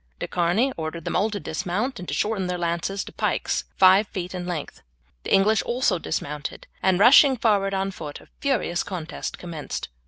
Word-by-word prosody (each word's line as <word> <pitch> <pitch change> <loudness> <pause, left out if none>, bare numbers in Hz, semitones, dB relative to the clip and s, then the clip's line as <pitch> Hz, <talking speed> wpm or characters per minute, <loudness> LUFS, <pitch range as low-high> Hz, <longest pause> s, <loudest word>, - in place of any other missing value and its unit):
De - - -4
Charny 180 +10 +1
ordered 160 0 -5
them - - -2
all 215 - +2
to 205 -2 -4
dismount 200 +11 -3
and 180 - -8
to - - -3
shorten 210 -3 0
their 180 0 -2
lances 175 +3 -2
to - - -10
pikes - - -1
five 190 +2 +6
feet 180 -1 -5
in 180 -1 -5
length. 170 -5 -5 0.4
The - - -7
English 210 +3 +4
also 235 -7 0
dismounted 150 -2 -4 0.2
and 190 -1 +3
rushing 265 +4 +7
forward 200 -4 +2
on 195 0 -1
foot 150 -5 -8
a - - -18
furious 245 -11 0
contest 175 -5 -5
commenced. 165 - -6
185 Hz, 185 wpm, -24 LUFS, 170-210 Hz, 0.4 s, rushing